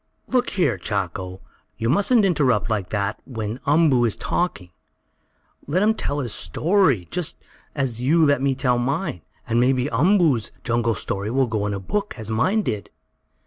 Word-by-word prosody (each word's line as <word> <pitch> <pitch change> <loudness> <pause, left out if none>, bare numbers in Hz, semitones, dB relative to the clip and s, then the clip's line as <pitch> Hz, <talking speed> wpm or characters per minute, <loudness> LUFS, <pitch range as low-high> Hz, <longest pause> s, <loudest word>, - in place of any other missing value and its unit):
"Look 250 -1 +1
here, 145 - 0
Chako! 95 -1 -4 0.4
You 115 - -2
mustn't 205 - +3
interrupt 130 - +2
like 100 -4 -1
that 100 -1 -2
when 115 -1 -4
Umboo 145 -4 +4
is 110 - +1
talking! 100 - -2 1.0
Let 180 +7 +1
him 220 +1 +4
tell 145 -9 -3
his 120 -5 -4
story, 160 - +1
just 180 -4 -2 0.4
as 130 -5 -1
you 155 +5 +4
let 140 -3 +2
me 135 -1 +1
tell 125 -2 +1
mine. 135 - -2 0.3
And 115 +1 +1
maybe 130 +2 +2
Umboo's 150 - +3
jungle 115 -2 0
story 100 +3 -3
will 130 +3 +2
go 110 -3 -2
in 105 - -2
a - - -4
book, 205 - -3
as 110 -1 -4
mine 185 - +1
did." 105 - -3
125 Hz, 165 wpm, -22 LUFS, 110-165 Hz, 1.0 s, Umboo